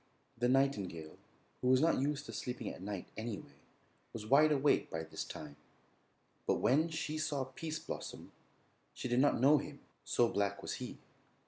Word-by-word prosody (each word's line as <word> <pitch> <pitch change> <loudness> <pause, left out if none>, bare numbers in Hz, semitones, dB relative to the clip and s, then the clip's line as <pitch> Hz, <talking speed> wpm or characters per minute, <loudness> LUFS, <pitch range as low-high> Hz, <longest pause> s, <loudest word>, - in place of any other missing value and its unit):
The 120 +1 +1
nightingale, 100 - 0 0.4
who 125 - 0
was 130 0 +6
not 160 -2 +3
used 145 +1 -1
to - - -8
sleeping 125 -1 -4
at - - -8
night, 100 -1 -5
anyway, 110 -2 -5 0.6
was 110 -2 -6
wide 145 +6 +6
awake 145 0 +3
by 80 0 -3
this 80 - -5
time, 75 -1 -8 0.9
but - - +4
when 155 +7 +3
she 155 -1 -3
saw 145 -3 0
Pease 155 +4 -5
Blossom - - -7 0.6
she - - -3
did 120 0 +2
not 145 -2 +4
know 145 +4 +6
him, 145 0 -8 0.2
so 120 - +3
black 100 -2 -1
was - - -3
he. - - -5
130 Hz, 165 wpm, -35 LUFS, 105-145 Hz, 0.9 s, was